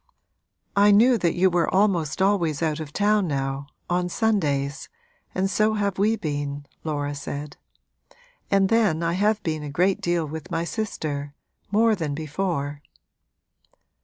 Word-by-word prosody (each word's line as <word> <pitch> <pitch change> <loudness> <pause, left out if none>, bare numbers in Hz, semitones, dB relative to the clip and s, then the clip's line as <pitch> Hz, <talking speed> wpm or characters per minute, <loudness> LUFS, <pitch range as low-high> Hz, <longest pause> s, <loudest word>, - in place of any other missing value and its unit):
'I 205 +1 +6
knew 240 +4 +6
that 170 -2 +1
you 185 +1 +3
were 170 -1 +1
almost 190 -4 +2
always 170 -6 +1
out 155 -1 0
of 155 -2 -6
town 205 +1 +2
now, 135 -1 -2 0.2
on 180 0 0
Sundays 150 -11 0 0.5
and 190 +1 +1
so 215 +2 +2
have 200 -2 -1
we 215 +3 +3
been,' 145 -5 -4 0.2
Laura 145 -2 -2
said. 145 0 -6 0.9
'And 195 -1 +3
then 210 -8 +2
I 170 0 +1
have 210 +3 +1
been 155 -2 -2
a 150 - -5
great 180 +6 +1
deal 175 -2 0
with 155 0 -7
my 165 -2 -1
sister 150 -8 -4 0.4
more 225 +2 +4
than 160 -8 -2
before.' 150 -2 -3
170 Hz, 145 wpm, -24 LUFS, 145-200 Hz, 0.9 s, I